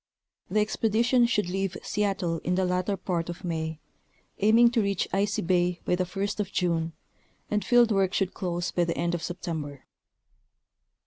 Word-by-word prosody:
The 215 - +2
expedition 230 +3 +2
should 210 -5 +1
leave 190 0 -2
Seattle 195 -5 -1
in 180 +3 -1
the 190 0 +1
latter 180 +2 0
part 175 -2 -2
of 175 +2 -7
May, 160 -2 -3 0.6
aiming 230 +3 +5
to 235 -2 +2
reach 200 -3 0
Icy 200 +1 +1
bay 175 0 +1
by - - +1
the 180 0 0
first 195 +3 -3
of 205 -1 -2
June, 165 -2 0 0.6
and 210 0 +1
field 240 -2 +4
work 195 -2 +2
should 195 -2 0
close 175 -2 -2
by 175 - +1
the 170 - -2
end 170 0 0
of 175 - -2
September. 160 -6 -5
185 Hz, 170 wpm, -27 LUFS, 175-210 Hz, 0.6 s, aiming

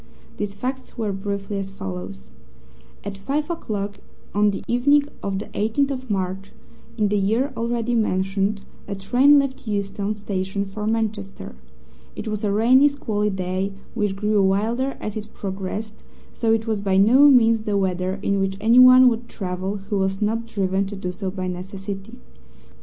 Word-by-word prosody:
These 205 -1 -3
facts 260 +6 -5
were 220 -3 -1
briefly 200 +1 -3
as 195 -1 -4
follows: 90 - -7 0.7
At 200 -1 -6
five 295 - -2
o'clock 205 -10 -4 0.3
on 210 +1 +4
the 200 - -4
evening 285 +5 +4 0.2
of 195 -1 -2
the 205 - -4
18th 250 +7 0
of 260 -2 -5
March 195 0 -3 0.4
in 210 -2 +2
the 205 0 +1
year 230 +8 +1
already 235 +1 -1
mentioned 195 -2 0 0.3
a 200 - -3
train 255 +9 +5
left 275 -3 -1
Euston 200 0 -2
Station 200 -1 -3
for 210 +2 -5
Manchester. 215 - -3 0.6
It - - -6
was 215 -1 -3
a 205 - +1
rainy, 250 +7 +5
squally 215 -7 -1
day, 190 0 -2 0.2
which 210 -4 -1
grew 210 +1 +1
wilder 225 +8 +1
as 210 - -5
it 215 0 -7
progressed, 200 +3 -5 0.3
so 225 -1 0
it 225 0 +1
was 220 -3 -1
by 195 -2 +1
no 250 +9 +7
means 230 -4 +5
the 210 -2 -1
weather 185 0 -1
in 200 0 +1
which 195 0 -1
anyone 255 +3 +8
would 235 0 0
travel 190 0 -3
who 205 - +1
was 190 0 0
not 225 +2 -1
driven 195 -2 0
to 205 - -6
do 185 -2 -4
so 190 +1 -4
by 185 -1 -4
necessity. 195 +2 -6
205 Hz, 165 wpm, -23 LUFS, 195-230 Hz, 0.7 s, anyone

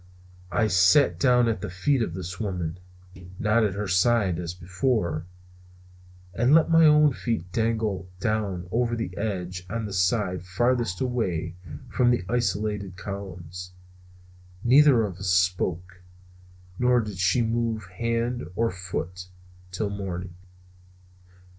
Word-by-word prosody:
I 115 - +2
sat 95 +8 +4
down 125 -3 +4
at 110 -5 -1
the - - -4
feet 125 +9 +1
of 90 -7 -2
this 90 0 -6
woman 90 -5 -3 0.6
not 110 +3 +2
at 100 -3 0
her 105 0 -3
side, 95 -1 +2
as 85 0 -5
before 90 - -1 1.1
and 120 - +4
let 165 0 +4
my 165 -1 +7
own 150 -1 +5
feet 110 -8 -3
dangle 110 -4 -1
down 100 -5 -2
over 120 +1 +1
the 90 -6 -4
edge 90 -4 -3
on 115 +1 -3
the 100 - -6
side 90 -1 +1
farthest 115 +1 0
away 115 -12 -1 0.4
from 125 -1 +3
the 120 -7 +1
isolated 105 -4 -1
columns. 90 -2 -7 0.9
Neither 130 -1 +6
of 95 -4 -4
us 95 -1 -2
spoke; 90 0 0 0.8
nor 125 0 +4
did 105 -4 -7
she 100 +6 +3
move 115 -1 -1
hand 115 +6 -2
or 115 +1 +1
foot 90 0 -5 0.4
till 100 +3 -3
morning. 95 -3 -5
100 Hz, 130 wpm, -25 LUFS, 90-115 Hz, 1.1 s, my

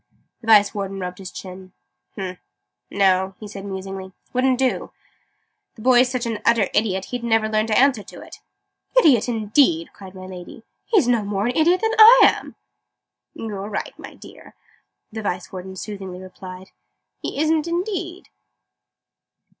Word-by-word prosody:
The 225 - -13
Vice 205 -2 +6
Warden 195 -1 -4
rubbed 180 0 -6
his 190 -2 -7
chin. 185 0 -10 0.4
"Humph! 185 -2 -6 0.5
No!" 190 -1 +2
he 215 - -8
said 200 -1 -9
musingly. 190 -1 -7 0.2
"Wouldn't 255 0 +2
do. 260 0 -1 0.8
The 220 - -12
boy's 250 0 +5
such 255 -1 -2
an 225 -2 -3
utter 230 -4 +3
idiot, 190 -3 0
he'd 245 -1 -4
never 225 -2 +2
learn 215 0 0
to 215 - +1
answer 265 -4 +4
to - - -12
it." - - -12 0.6
"Idiot, 260 - +5
indeed!" 215 - +1
cried 190 -1 -12
my 185 0 -9
Lady. 185 +3 -10 0.2
"He's 390 - +3
no 240 -2 +3
more 200 0 -2
an 245 +1 -1
idiot 345 +4 +3
than 445 0 +1
I 460 +3 +10
am!" - - +2 0.8
"You're 205 -2 -6
right, 210 - -4
my - - -10
dear," - - -15 0.6
the 220 0 -5
Vice 180 -3 -4
Warden 190 0 -8
soothingly 190 -2 -7
I 185 - -10
replied. 185 0 -11 0.5
"He - - -5
isn't, 315 +1 +1
indeed!" 355 +1 -4
210 Hz, 160 wpm, -22 LUFS, 190-255 Hz, 0.8 s, I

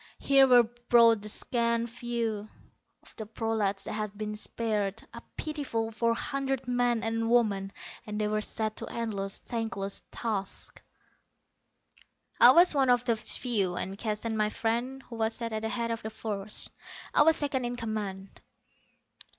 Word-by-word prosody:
Here 275 -1 +5
were 245 -2 +7
brought 235 -1 +4
the 210 - -1
scant 235 +1 +1
few 230 -3 -3 0.5
of - - -17
the 220 - -6
prolats 215 -3 -1
that - - -5
had 210 -1 -4
been 210 0 -4
spared, 210 -2 -2
a - - -8 0.2
pitiful 275 -8 -3
four 230 +1 +1
hundred 270 0 -3
men 245 -2 +1
and 225 0 -1
women, 205 -5 +2 0.4
and 210 0 -4
they 210 - +1
were 215 0 0
set 215 0 -3
to - - -4
endless, 200 -4 -3
thankless 220 -4 -4
tasks._ 205 -4 -4 1.6
_I 250 +2 +10
was 350 0 +7
one 270 -3 +2
of 245 0 +3
those 225 -2 0
few; 200 -8 0
and 190 +2 -3
Keston, 215 +1 -3
my 215 -1 +1
friend, 240 +5 -2
who 230 - -10
was 220 0 0
set 230 -1 -3
at 215 - -2
the 220 - -2
head 235 0 -2
of 230 - -3
the 220 - -5
force. 210 -2 -1 0.4
I - - +5
was 320 +1 +6
second 275 -4 +1
in 240 0 -3
command. 210 -4 -5
225 Hz, 160 wpm, -29 LUFS, 210-240 Hz, 1.6 s, I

